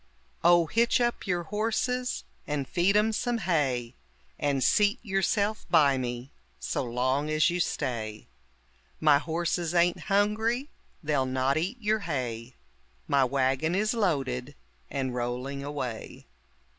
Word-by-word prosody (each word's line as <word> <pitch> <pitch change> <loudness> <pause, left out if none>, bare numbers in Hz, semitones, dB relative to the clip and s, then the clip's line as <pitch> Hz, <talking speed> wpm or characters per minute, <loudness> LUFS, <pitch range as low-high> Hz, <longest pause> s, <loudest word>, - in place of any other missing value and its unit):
Oh, 175 -1 +6
hitch 235 +9 +2
up 240 -3 -1
your 175 -2 0
horses 230 +6 -1 0.2
and 145 -3 -2
feed 190 +3 +2
'em 220 +1 +2
some 240 +2 0
hay, 140 - -1 0.4
And 140 -2 +1
seat 210 - +3
yourself 205 +1 0
by 145 -6 +4
me 120 +1 -4 0.3
so - - -2
long 130 +4 0
as 155 +2 +3
you 175 - -1
stay. 115 -10 -3 0.7
My 150 -2 +5
horses 170 +2 -2
ain't 175 0 +3
hungry, 220 +7 +1 0.3
they'll 145 -4 +1
not 130 +1 +1
eat 185 +10 -2
your 215 0 +1
hay; 125 - -4 0.5
My 140 -1 +3
wagon 135 +5 +1
is 215 +3 +1
loaded 140 - -1 0.3
and 130 -2 -2
rolling 125 +3 -3
away. 135 -6 -5
155 Hz, 130 wpm, -28 LUFS, 130-205 Hz, 0.7 s, Oh